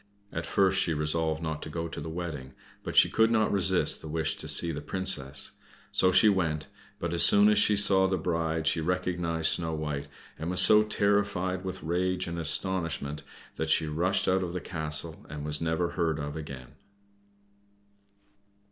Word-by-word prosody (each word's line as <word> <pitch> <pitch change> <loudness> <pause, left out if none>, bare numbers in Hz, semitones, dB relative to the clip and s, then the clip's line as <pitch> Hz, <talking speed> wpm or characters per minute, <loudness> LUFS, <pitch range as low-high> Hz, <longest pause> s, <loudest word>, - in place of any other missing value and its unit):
At - - -4
first 95 -1 +2
she 80 - -1
resolved 80 +1 -1
not 80 -1 -4
to - - -7
go 85 +1 -4
to 80 - -7
the 80 - -6
wedding, 80 -6 -6 0.3
but - - -6
she - - +7
could 110 0 +2
not 110 -2 +1
resist 95 -2 +2
the - - -9
wish 80 0 -1
to - - -5
see 85 - +5
the 75 -2 -5
Princess. 75 -5 0 0.4
So 95 - +3
she 95 +4 +5
went; 80 -7 0 0.3
but 85 0 -4
as 85 - +1
soon 105 +1 +6
as 105 -1 +3
she 105 - +3
saw 95 -2 +5
the 95 0 -1
bride 80 -2 -2
she 80 +1 +1
recognized 85 -2 -1
Snow 80 -2 -1
White, 75 -2 -4 0.3
and 80 +2 -4
was 90 - +1
so 105 0 +7
terrified 100 -3 0
with 95 0 -6
rage 90 +2 -1
and 85 0 -5
astonishment 80 -3 -2 0.4
that - - -3
she - - +2
rushed 90 +6 0
out 95 0 +2
of 90 -2 -4
the 90 - -3
castle 80 -1 -2
and 75 0 -7
was 75 0 -2
never 80 +1 -1
heard 80 -3 -1
of 75 0 -5
again. 70 -5 -8
85 Hz, 185 wpm, -28 LUFS, 80-95 Hz, 0.4 s, she